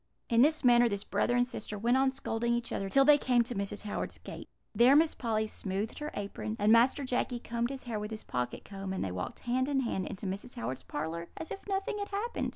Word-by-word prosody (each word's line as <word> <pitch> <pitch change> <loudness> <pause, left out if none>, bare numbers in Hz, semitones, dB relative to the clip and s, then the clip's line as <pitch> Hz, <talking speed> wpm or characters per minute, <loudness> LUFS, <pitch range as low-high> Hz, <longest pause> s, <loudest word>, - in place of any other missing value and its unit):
"In 230 0 +5
this 310 +3 +4
manner 240 -1 +6
this 200 -1 -2
brother 245 - +1
and 245 0 +4
sister 215 -4 -6
went 235 +4 +2
on 265 0 +4
scolding 235 -3 -1
each 235 -1 -3
other 195 - -2
till 275 +5 +5
they 295 0 +7
came 245 -3 +3
to 245 - -5
Mrs. 200 0 -3
Howard's 210 - -4
gate. - - -9 0.2
There 250 +4 +6
Miss 315 +1 +5
Polly 220 -3 -1
smoothed 205 0 -4
her 300 0 -3
apron, 205 +2 -4
and 210 0 +3
Master 245 +5 +5
Jacky 250 -1 -1
combed 235 0 -2
his 270 -1 -6
hair 230 -3 -3
with 210 0 -4
his 220 -1 -6
pocket 125 -1 -3
comb, 195 -1 -5
and 190 - -2
they 95 - -3
walked 90 0 -5
hand 255 +3 0
in 275 -2 +2
hand 195 -7 -2
into 195 - -6
Mrs. 195 +6 -4
Howard's 125 +3 -4
parlour 160 +3 -4
as 320 - -6
if - - -4
nothing 390 +1 -1
had 405 - -4
happened. 415 +4 -2
235 Hz, 240 wpm, -31 LUFS, 200-265 Hz, 0.2 s, they